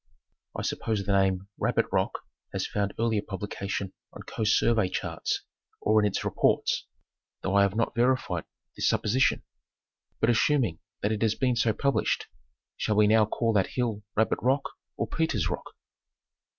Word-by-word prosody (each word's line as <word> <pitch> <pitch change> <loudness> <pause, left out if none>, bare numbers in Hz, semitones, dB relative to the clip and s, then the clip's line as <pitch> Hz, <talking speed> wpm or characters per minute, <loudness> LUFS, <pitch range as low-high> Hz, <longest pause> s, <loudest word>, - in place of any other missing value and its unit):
I - - -3
suppose 110 -3 -1
the 100 - -1
name 95 -1 +2
Rabbit - - +2
Rock - - 0 0.3
has - - -1
found 100 -1 -1
earlier 115 -2 +1
publication 100 -1 -4 0.2
on - - -10
Coast 105 -1 +1
Survey 110 -5 +2
charts - - -2 0.4
or 110 0 +3
in 105 - +3
its 100 - -2
reports, - - +1 0.6
'though 95 - -1
I 100 - +5
have 100 0 +2
not 115 0 0
verified 125 +2 +1 0.3
this - - +1
supposition. 125 +5 +2 0.8
But 115 - +4
assuming 120 - +2 0.2
that 105 - +2
it 110 - -2
has 110 -1 +2
been 125 -2 +1
so 115 -1 +3
published, 140 +6 0 0.5
shall 105 - 0
we 105 0 +5
now 110 0 +5
call 115 +1 0
that 100 -3 +3
hill 115 -4 0
Rabbit 110 +1 +2
Rock 135 +3 +1 0.3
or - - 0
Peter's 110 - 0
Rock - - -6
110 Hz, 160 wpm, -28 LUFS, 100-115 Hz, 0.8 s, I